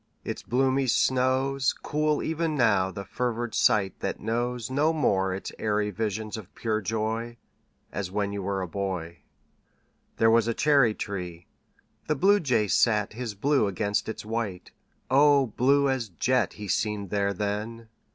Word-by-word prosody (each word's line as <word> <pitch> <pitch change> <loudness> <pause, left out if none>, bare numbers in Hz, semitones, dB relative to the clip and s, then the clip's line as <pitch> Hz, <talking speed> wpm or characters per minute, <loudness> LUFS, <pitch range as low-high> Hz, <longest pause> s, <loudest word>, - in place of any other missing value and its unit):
Its - - -5
bloomy 130 +2 +1
snows 130 +2 +2
Cool 150 0 -1
even 160 0 -1
now 100 -8 +3
the 100 +2 -7
fevered 120 -1 -3
sight 100 -3 +3
that - - -3
knows 120 +2 -2
No 150 +4 +2
more 95 -11 +1
its 95 +1 -5
airy 105 -1 0
visions 110 +1 -3
of 100 -3 -11
pure 110 -1 -1
joy 110 +3 -2 0.5
As 95 -3 -4
when 100 +1 -1
you 100 - -3
were 95 0 -2
a - - -4
boy. 90 -3 -4 1.0
There 115 0 +4
was 115 0 +4
a 115 - 0
cherry 140 -7 +4
tree. 90 -4 -6 0.6
The 155 - +1
Bluejay 145 - +3
sat 105 0 +2
His 115 -2 -5
blue 135 +1 +2
against 100 +2 -1
its 110 - -6
white 110 -5 -4 0.4
O 140 0 +5
blue 140 +4 +2
as 130 -5 -1
jet 125 +7 0
He 105 -1 -8
seemed 105 -1 -1
there 100 -1 +1
then! 105 +4 -4
110 Hz, 150 wpm, -27 LUFS, 100-130 Hz, 1.0 s, O